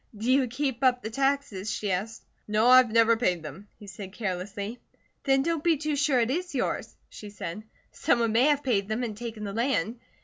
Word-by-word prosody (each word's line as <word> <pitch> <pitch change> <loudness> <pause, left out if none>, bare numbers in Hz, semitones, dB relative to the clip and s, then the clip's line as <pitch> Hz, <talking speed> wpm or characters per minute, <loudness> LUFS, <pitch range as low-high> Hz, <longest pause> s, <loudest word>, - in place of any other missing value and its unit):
"Do 225 +5 0
you 265 -1 +3
keep 265 +1 -3
up 250 -1 +3
the 220 - -5
taxes?" 270 -6 -1
she 205 -1 -2
asked. 205 +5 -3 0.2
"No. 215 +3 +3
I've 255 -2 +7
never 230 0 +5
paid 180 -8 0
them," 155 +7 -9
he 210 - -13
said 195 -1 -9
carelessly. 200 +2 -4 0.5
"Then 270 -1 +3
don't 330 -1 -1
be 335 -2 +3
too 305 +1 -2
sure 280 -2 +2
it 235 +1 +1
is 350 +1 -3
yours," - - -2
she 210 - -10
said. 200 -1 -6 0.3
"Someone 230 -2 +1
may 235 +4 +4
have 290 -1 +2
paid 200 -7 +1
them 220 +3 -2
and 220 -3 -4
taken 225 -1 -7
the 200 -1 -4
land. 235 -1 -1
230 Hz, 205 wpm, -27 LUFS, 210-270 Hz, 0.5 s, I've